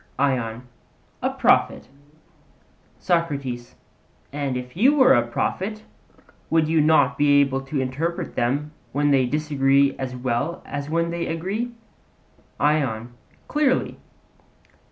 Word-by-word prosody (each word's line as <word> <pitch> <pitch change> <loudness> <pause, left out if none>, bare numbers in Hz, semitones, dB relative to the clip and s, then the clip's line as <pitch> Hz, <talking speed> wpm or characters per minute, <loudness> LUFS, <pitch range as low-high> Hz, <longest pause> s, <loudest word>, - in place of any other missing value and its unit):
ION: 125 -4 -1 0.6
A - - +1
prophet. - - +2 1.1
SOCRATES: 140 -9 -2 0.6
And 140 -3 -2
if 125 +2 -8
you 260 - +4
were 260 -3 +6
a 120 -1 +2
prophet, 205 - -3 0.7
would 160 -1 +2
you 160 0 +3
not 155 +1 +3
be 145 -1 +5
able 135 -1 +1
to 135 +1 -4
interpret 145 +7 -3
them 140 +5 -1 0.2
when 145 +1 +2
they 130 -2 +3
disagree 140 -1 +2
as 130 -1 -4
well 125 +6 -2
as 145 0 -5
when 165 +1 0
they 170 0 -3
agree? 195 +9 -3 0.9
ION: 125 -6 0 0.3
Clearly. 290 -3 0
145 Hz, 115 wpm, -23 LUFS, 130-165 Hz, 1.1 s, were